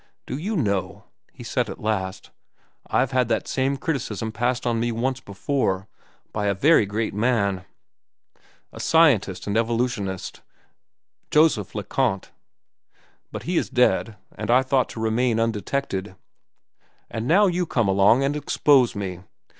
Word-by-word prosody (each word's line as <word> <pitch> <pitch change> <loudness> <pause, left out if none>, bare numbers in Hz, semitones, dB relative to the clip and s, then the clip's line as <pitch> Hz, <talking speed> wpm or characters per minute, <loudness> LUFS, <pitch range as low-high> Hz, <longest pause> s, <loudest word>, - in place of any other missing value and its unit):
"Do - - -5
you 195 +10 -3
know," 100 - -1 0.3
he - - -12
said - - -1
at - - -7
last, 95 -3 -3 0.6
"I've 130 - +1
had 130 -2 +2
that - - -1
same 135 +1 0
criticism 115 -7 -3
passed 120 +3 -1
on 120 -1 +1
me 120 +1 0
once 125 +3 -1
before—by 100 -2 -4
a 100 - +1
very 140 - +4
great 110 +2 -2
man, 100 -4 0 1.1
a - - -10
scientist 135 - +3
and 100 - -2
evolutionist, 115 -5 -1 0.9
Joseph 150 - +2
Le 105 - -3
Conte. 105 -2 -1 1.0
But - - -6
he 175 +1 -1
is - - 0
dead, 115 -3 +2 0.2
and 110 +2 -6
I 125 +2 +5
thought 130 -1 +1
to - - -8
remain 115 +1 +1
undetected; 105 -3 -2 1.0
and 110 +2 -4
now 195 +6 +5
you 180 -2 0
come 115 -8 +1
along 100 +7 +4
and 140 +2 0
expose 145 -3 +3
me. 95 -3 -4
115 Hz, 140 wpm, -23 LUFS, 100-135 Hz, 1.1 s, I